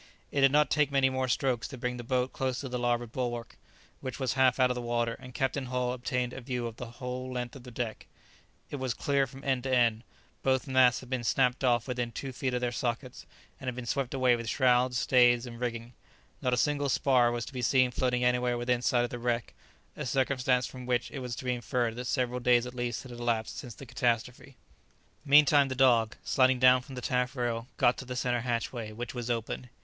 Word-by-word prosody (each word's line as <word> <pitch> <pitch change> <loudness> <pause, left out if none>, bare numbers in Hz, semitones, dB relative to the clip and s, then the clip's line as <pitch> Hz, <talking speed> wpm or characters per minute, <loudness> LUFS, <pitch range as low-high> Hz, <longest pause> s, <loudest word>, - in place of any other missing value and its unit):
It 140 - 0
did 135 0 +6
not 150 +1 +3
take 150 -2 +3
many 135 -1 +3
more 130 0 -1
strokes 125 -2 0
to 130 - -9
bring 125 0 -3
the 120 - -6
boat 125 +1 -1
close 130 -1 -2
to 140 - -5
the 125 0 -3
larboard 120 -1 0
bulwark, 120 -2 -4 0.4
which 130 +1 -6
was 130 -3 0
half 130 -1 +3
out 125 -1 +4
of - - +1
the 125 - -4
water, 120 -1 -1
and 130 -1 -11
Captain 135 0 -1
Hull 125 0 -1
obtained 125 0 -2
a - - -7
view 125 -1 -3
of 115 -1 -6
the 120 -2 -8
whole 125 +1 -5
length 125 0 -4
of 135 - -10
the 125 - -11
deck. 115 -2 -5 0.6
It 145 - -3
was 130 -3 -2
clear 140 -1 +1
from 135 +1 -12
end 130 -2 0
to 130 - -1
end. 115 -2 +2 0.4
Both 130 -1 +1
masts 130 -3 +4
had 130 0 -13
been 130 -2 -1
snapped 125 +2 +1
off 120 -2 +2
within 125 -2 -2
two 135 +3 -5
feet 130 0 -2
of 125 - -1
their 120 -1 0
sockets, 120 +1 -4 0.3
and 130 - -8
had 125 - -2
been 125 -1 -6
swept 135 +2 -2
away 130 -2 +4
with 115 -1 -5
shrouds, 125 -1 +3
stays, 120 +3 +4
and 120 -1 -9
rigging. 120 -1 -4 0.5
Not 125 -1 +1
a - - -5
single 145 +1 +1
spar 125 -2 +3
was 120 -1 -3
to - - -10
be 125 - -4
seen 125 +1 +3
floating 125 0 0
anywhere 125 0 +2
within 120 0 0
sight 125 0 +2
of 120 - -3
the 120 - -5
wreck, 120 -1 -2 0.4
a 150 - -4
circumstance 130 -1 +1
from 125 -1 -9
which 125 -1 0
it 140 - -5
was 125 -2 -4
to - - -8
be 125 - +1
inferred 120 -1 -1
that 125 - -4
several 125 -1 0
days 120 -1 +3
at 125 - -7
least 120 -1 -3
had 130 - -11
elapsed 120 -2 -2
since 120 -5 -9
the 135 - -10
catastrophe. 125 +1 -2 0.7
Meantime 145 -1 +6
the 130 - -4
dog, 120 -4 +4
sliding 130 -1 +3
down 130 0 +6
from 130 +1 -11
the 125 - -5
taffrail, 125 -2 -1
got 120 - +3
to 130 - -7
the 125 0 -5
centre 125 -1 0
hatchway, 115 -2 -3
which 120 +2 -6
was 120 -1 -5
open. 120 +1 -3
125 Hz, 230 wpm, -29 LUFS, 120-130 Hz, 0.7 s, did